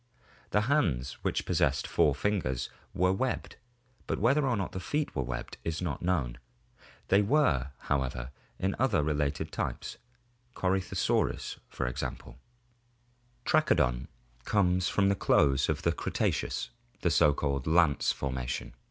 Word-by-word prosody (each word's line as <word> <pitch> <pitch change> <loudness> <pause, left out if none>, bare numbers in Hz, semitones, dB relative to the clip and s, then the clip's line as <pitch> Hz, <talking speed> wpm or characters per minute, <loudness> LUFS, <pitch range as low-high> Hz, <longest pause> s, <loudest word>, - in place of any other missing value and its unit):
The 105 - +2
hands, 90 - +1
which - - -1
possessed 70 -1 +1
four 75 - +3
fingers, 75 -9 -1 0.2
were 90 +1 +2
webbed, 130 +6 -2 0.5
but - - -1
whether 140 +6 +3
or 120 -4 +1
not 95 - -2
the 95 - -4
feet 145 +11 -2
were - - +1
webbed 65 -1 -5
is 80 -1 -2
not 85 -6 -3
known. 70 -10 0 0.7
They 100 +2 +5
were, 100 - +2
however, 65 -3 -2 0.3
in 95 +1 -1
other 115 - +3
related 75 -1 -1
types - - -4 0.6
(Corytho 95 0 0
saurus). - - 0 1.9
Trachodon 65 - +2 0.4
comes 90 - +2
from 100 -1 +3
the - - +4
close 70 -7 +3
of - - -1
the - - +3
Cretaceous, - - -1 0.3
the - - +2
so 75 - +5
called 70 -1 -2
Lance 80 -3 +4
formation. 65 -3 -3
80 Hz, 130 wpm, -30 LUFS, 70-100 Hz, 1.9 s, They